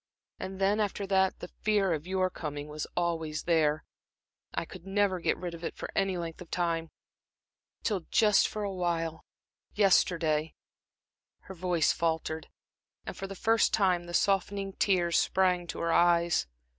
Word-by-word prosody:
And 190 0 -6
then, 200 +2 +2
after 205 -1 -1
that, 190 -1 +1
the 175 - -8
fear 205 -4 +2
of 155 +2 -4
your 185 0 0
coming 145 -2 -5
was 150 0 -5
always 165 -3 -1
there 155 -3 +2 0.7
I - - -2
could 180 +1 -11
never 195 -1 +1
get - - 0
rid 175 -2 -5
of 170 0 -9
it - - -4
for - - -6
any 195 -2 +1
length 165 0 -6
of 180 - -10
time, 165 -2 -1 0.9
till 195 -6 -1
just 210 -3 +4
for 215 - -4
a 200 -1 -2
while 165 -3 -2 0.5
yesterday" 165 -6 +2 0.9
Her 190 - -10
voice 175 -3 +1
faltered, 160 -1 -2 0.6
and - - -6
for 195 - -5
the 195 - -7
first 225 +3 +3
time 180 -4 +2
the 175 0 -4
softening 195 +1 +1
tears 175 -4 +2
sprang 180 -2 +1
to - - -5
her 170 0 +1
eyes. 170 - +3
175 Hz, 160 wpm, -30 LUFS, 165-195 Hz, 0.9 s, just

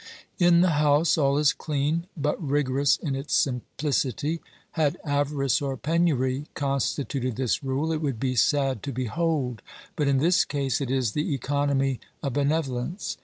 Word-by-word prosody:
In 175 -1 +5
the 185 - +4
house 150 +2 +4
all 140 -2 +2
is 150 -2 +4
clean, 155 +3 -1
but 150 0 0
rigorous 140 -1 +2
in 145 -5 -3
its 135 +3 -2
simplicity. 140 +3 -1 0.3
Had 160 0 0
avarice 145 -3 +1
or 135 -2 -2
penury 145 -3 0
constituted 135 -2 -1
this 130 +2 -1
rule, 135 +4 -1
it 155 - -2
would 135 -7 -2
be 130 0 -1
sad 135 -1 +2
to 140 - -4
behold, 130 0 -1 0.3
but 150 - 0
in 140 -1 +3
this 165 +5 +4
case 140 -2 -1
it 135 - -2
is 130 -4 +1
the 150 +3 -1
economy 135 -1 0 0.2
of 140 -3 -2
bene 140 +1 +1
volence. 150 +2 -2
140 Hz, 160 wpm, -26 LUFS, 130-150 Hz, 0.3 s, In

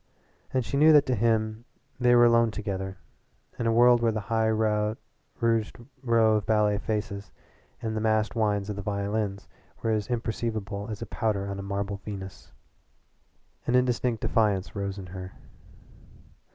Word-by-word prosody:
And 130 -2 0
she 140 - -2
knew 155 +2 +7
that 145 -2 +6
to 130 - 0
him 110 0 0 0.4
they 120 -1 +5
were 120 0 +7
alone 115 -1 +4
together 95 -3 -4 0.6
in 115 - 0
a - - +3
world 120 +1 +5
where 115 -1 +3
the 110 +1 -4
high 110 0 +2
rouged 110 +1 -1 0.2
row 115 -3 +3
of 105 - -3
ballet 105 -2 +2
faces 105 -2 -4 0.5
and 110 -1 -2
the 110 - -1
massed 110 0 +1
whines 105 -3 +1
of - - -5
the 100 - -5
violins 100 0 -2 0.4
were 115 - +1
as 105 -2 0
imperceivable 110 -3 -3
as 110 +1 -5
powder 105 -3 -1
on 100 0 -4
a - - -4
marble 100 0 -3
Venus. 100 -2 -9 1.2
An 120 - +2
instinctive 125 -2 +1
defiance 105 -1 +1
rose 100 -1 -3
within 90 -2 -9
her. 95 0 -7
110 Hz, 155 wpm, -27 LUFS, 100-115 Hz, 1.2 s, knew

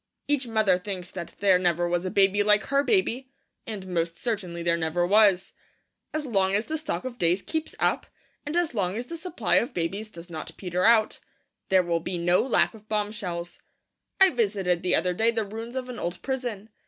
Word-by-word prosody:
Each 285 -3 0
mother 215 -5 +2
thinks 185 -2 -6
that 175 -3 -7
there 190 -3 +5
never 175 -1 +1
was 175 +1 -1
a - - -1
baby 195 +1 +3
like 210 0 +4
her 280 +1 +1
baby; 270 - +1 0.4
and 210 -4 -5
most 170 -2 -2
certainly 185 -8 -3
there 170 0 +2
never 170 +1 0
was. 195 -1 +4 0.6
As 310 -1 -3
long 195 -5 +1
as 210 +2 0
the 315 0 -3
stock 310 -4 -4
of 245 -1 -6
days 175 +3 +2
keeps 320 -1 -4
up, - - +1 0.4
and 300 +3 -2
as 345 -5 +1
long 195 -2 -1
as 240 - -4
the 335 - -7
supply 325 - 0
of 245 - 0
babies 195 +6 -2
does 170 -4 -11
not 155 -1 -7
peter 180 -1 -1
out, 225 -2 +4 0.5
there 190 -1 +5
will 170 -1 0
be 175 +2 -4
no 175 +1 +3
lack 255 - +2
of 215 -1 -16
bombshells. 205 -5 -3 0.6
I 385 -1 +7
visited 195 -7 0
the 180 - +2
other 180 +2 +1
day 225 +5 +3
the 225 -2 0
ruins 225 +4 -7
of 255 -1 -3
an 250 -1 -7
old 175 +1 -4
prison. 245 -6 -4
205 Hz, 205 wpm, -26 LUFS, 180-235 Hz, 0.6 s, I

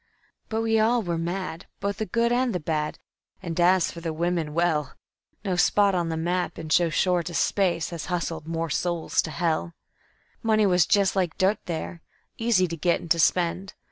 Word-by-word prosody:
But 225 0 -1
we 225 -1 +2
all 230 +2 +3
were 170 -3 -2
mad, 175 0 -4
both 200 0 -2
the 220 - -3
good 235 +5 +1
and 245 -3 +1
the - - 0
bad, 150 -1 -2 0.5
and 170 -1 -4
as 180 0 +4
for 170 - -9
the 165 -1 -3
women, 165 -1 -2
well 160 -5 0 0.5
No 190 -2 0
spot 200 +2 +3
on 175 -2 0
the 160 - -2
map 175 +2 -1
in 160 -1 -7
so 170 +1 +4
short 175 +1 +1
a 170 - -7
space 180 -3 +1
has 170 -2 -6
hustled 170 -3 -3
more 165 -1 -2
souls 170 +1 0
to - - -6
hell. 165 +1 -1 0.7
"Money 215 -2 +3
was 180 -4 +3
just 200 -1 +3
like 180 -4 0
dirt 195 +3 +2
there, 170 0 -5 0.4
easy 225 -6 +3
to 165 - -4
get 170 +2 +1
and 170 - -10
to 170 - +4
spend. 180 +3 +1
175 Hz, 195 wpm, -25 LUFS, 165-195 Hz, 0.7 s, as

